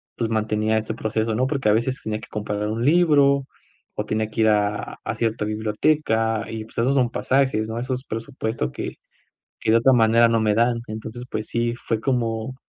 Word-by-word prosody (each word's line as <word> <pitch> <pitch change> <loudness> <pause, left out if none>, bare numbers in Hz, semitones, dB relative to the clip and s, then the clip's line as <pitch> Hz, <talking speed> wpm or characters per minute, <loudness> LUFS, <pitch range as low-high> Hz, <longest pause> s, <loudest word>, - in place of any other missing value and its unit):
pues 115 -2 -2
mantenía 110 0 0
este 110 0 -2
proceso, 110 0 -1
¿no? 130 +3 +1
Porque 135 -7 0
a - - +5
veces 125 +4 0
tenía 110 0 -3
que - - -12
comprar 105 0 -3
un 115 +3 -2
libro, 145 -4 +4 0.5
o 105 - -2
tenía 110 0 -1
que 110 - -2
ir 110 - +5
a 105 0 0
a 110 - -3
cierta 110 -1 -1
biblioteca 110 +1 0
y, 110 -1 -5
pues, - - -17
esos 125 +4 +2
son 125 -3 +3
pasajes, 130 -5 +1
¿no? 115 +1 -4
Esos 130 +1 -3
presupuestos 110 - -3
que - - -5 0.7
que - - 0
de 115 - +6
otra 130 +3 +4
manera 115 0 +5
no 115 -1 +2
me 105 -1 +2
dan. 115 +1 +2
Entonces, 110 +2 -6
pues 110 0 -3
sí 120 0 -1
fue 115 -2 -2
como 115 -1 -1
115 Hz, 200 wpm, -23 LUFS, 110-125 Hz, 0.7 s, de